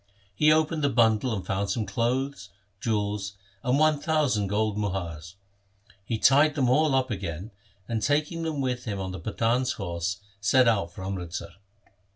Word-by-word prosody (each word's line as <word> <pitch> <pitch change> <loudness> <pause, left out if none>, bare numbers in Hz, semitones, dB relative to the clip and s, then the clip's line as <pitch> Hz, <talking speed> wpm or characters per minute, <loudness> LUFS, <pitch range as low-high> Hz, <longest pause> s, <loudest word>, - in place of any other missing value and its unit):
He 150 +10 +4
opened 155 0 +2
the 140 - +3
bundle 115 -1 +3
and 100 -5 -3
found 100 +2 -1
some 115 -3 -1
clothes, 120 +1 -1 0.3
jewels, 105 -2 -1 0.3
and 125 +2 +2
one 155 -1 +3
thousand 145 - +1
gold 105 +1 0
muhars. 90 -5 -4 0.7
He 110 +3 -2
tied 145 +6 +5
them 130 -4 +2
all 150 +1 +3
up 130 -1 +1
again, 95 0 -5 0.4
and, 115 -2 -2
taking 150 - 0
them 160 -3 -2
with 125 -1 -2
him 105 -4 -3
on 95 -1 -4
the 95 - -6
Pathan's 115 +7 0
horse, 85 0 -3 0.2
set 125 +5 +4
out 100 -7 +2
for 95 - -9
Amritsar. 90 -2 -5
110 Hz, 165 wpm, -27 LUFS, 100-135 Hz, 0.7 s, tied